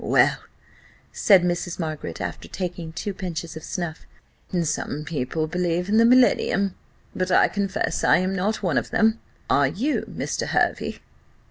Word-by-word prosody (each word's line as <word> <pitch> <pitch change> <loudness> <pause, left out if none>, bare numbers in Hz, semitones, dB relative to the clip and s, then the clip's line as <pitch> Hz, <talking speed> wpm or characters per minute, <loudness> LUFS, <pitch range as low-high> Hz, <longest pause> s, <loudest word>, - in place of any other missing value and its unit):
Well," - - +3 0.7
said 195 -4 +5
Mrs. 175 0 -1
Margaret, 155 - -4
after - - -5
taking 175 -3 -5
two 200 +5 -4
pinches 175 -4 -5
of 160 - -8
snuff, 170 -2 -5 0.6
"some 150 -1 -3
people 155 0 -2
believe 180 +2 -1
in 215 - +3
the 230 - +6
millennium; 235 -5 +4 0.4
but 185 0 -1
I 180 - +5
confess 200 0 -2
I - - +5
am 185 +2 -1
not 205 +4 -1
one 170 -7 +2
of - - -8
them 225 0 +2 0.3
are 140 -1 +4
you, 225 - -1
Mr. - - -3
Hervey?" - - 0
180 Hz, 150 wpm, -24 LUFS, 160-200 Hz, 0.7 s, the